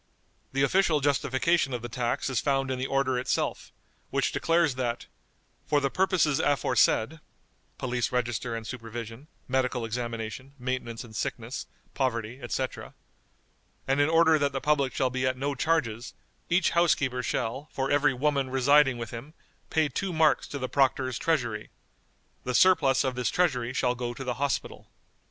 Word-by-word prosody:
The 135 +1 +1
official 165 +1 +3
justification 140 +1 +1
of 120 - -6
the - - -3
tax 120 0 -2
is 130 -4 0
found 135 +1 0
in 130 - -2
the 130 - -1
order 135 -2 +1
itself, 125 - -2 0.4
which - - 0
declares 165 -3 +2
that, 120 -2 -3 0.6
"for 145 - +3
the 140 -1 -1
purposes 185 -6 +2
aforesaid" 135 0 +2 0.6
(police 120 -2 -1
register 120 -1 -1
and 115 -1 -6
supervision, 115 +2 -7 0.2
medical 130 -2 0
examination, 115 +2 -5
maintenance 125 -2 -4
in 110 - -14
sickness, 115 +4 -4 0.3
poverty, 120 -2 -2
etc.), 130 +1 -4 0.9
"and 135 +2 +2
in 145 - +3
order 160 -1 +5
that 140 -1 0
the 135 - -1
public 140 -2 +1
shall 130 -2 +1
be 130 0 0
at 130 0 -1
no 140 +2 -1
charges, 125 -6 -1 0.3
each 175 +1 +3
housekeeper 140 -7 +2
shall, 125 +4 -3
for 135 0 -2
every 145 0 +4
woman 140 0 0
residing 135 0 +4
with 115 -2 -6
him, 135 +7 -9 0.3
pay 160 -1 +2
two 185 +7 -3
marks 160 -2 +3
to 145 - -5
the 130 -2 -3
Proctor's 130 -2 +1
treasury. 120 -10 -1 0.7
The 125 0 -2
surplus 160 -7 +5
of 130 -2 -1
this 125 -1 -1
treasury 130 -9 +1
shall 125 -1 +1
go 120 -1 -4
to 135 - -6
the 125 -1 -2
Hospital." 140 -1 -2
130 Hz, 160 wpm, -27 LUFS, 120-145 Hz, 0.9 s, order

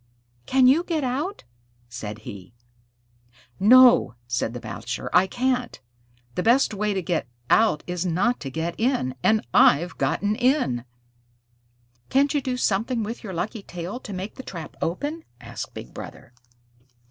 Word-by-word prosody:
"Can't 260 -1 +4
you 295 +7 +5
get 325 -5 -2
out?" 280 +10 -2 0.4
said 110 -2 -7
he. 100 +2 -10 1.0
"No," 245 - +7
said 120 -1 -2
the - - -4
Bachelor. 115 +2 -5
"I 180 +2 +6
can't. 250 +2 -1 0.5
The 180 - -1
best 235 +4 +3
way 210 0 -1
to 190 - -1
get 165 -4 -1 0.2
out 220 -9 +4
is 180 -1 -3
not 190 +8 +1
to 135 - -5
get 160 +4 -3
in 225 - +1
and 220 +1 +2
I've 185 - +4
gotten 205 +1 0
in." 245 - +1 1.2
"Can't 280 +2 +3
you 290 - +1
do 255 -1 -2
something 225 +1 0
with 230 +4 -6
your 195 -4 -6
lucky 205 +6 -3
tail 180 +5 -6
to 215 - -9
make 190 +2 -5
the - - -6
trap 165 - -8
open?" 290 - -3 0.2
asked - - -8
Big - - -9
Brother. 120 - -10
210 Hz, 150 wpm, -24 LUFS, 165-255 Hz, 1.2 s, No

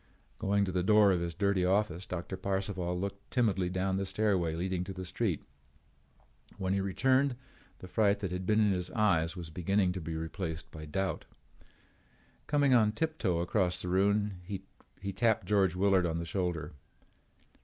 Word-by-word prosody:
Going 100 +1 +2
to 95 - -3
the 90 0 0
door 105 +1 +5
of 90 - +2
his 85 -1 -3
dirty 100 0 +1
office, 95 -1 +1
Doctor 90 +1 -4
Parcival 95 -2 -2
looked 100 +1 -5
timidly 100 -7 +1
down 95 +1 0
the 100 - -1
stairway 95 -6 +1
leading 90 +1 -1
to 95 - -6
the 95 0 -6
street. 90 -3 -1 1.1
When 95 0 -1
he 100 - +1
returned 130 +7 +2 0.4
the 90 - -10
fright 100 +1 +2
that 95 -3 -2
had 90 0 -4
been 110 0 +3
in 105 -2 +4
his 90 -1 -1
eyes 95 -7 +2
was 85 -2 -7
beginning 95 +3 +1
to 90 0 -5
be 80 0 -4
replaced 80 +1 -5
by 75 -1 -8
doubt. 95 +6 -2 1.2
Coming 145 -2 +3
on 110 -3 +4
tiptoe 110 - 0
across 90 0 +1
the 90 - -4
room 100 0 +1 0.6
he 100 +1 -3
tapped 110 +2 +2
George 95 -4 +2
Willard 95 -1 +3
on 80 0 -2
the 85 - -3
shoulder. 85 -4 -2
95 Hz, 170 wpm, -31 LUFS, 90-100 Hz, 1.2 s, door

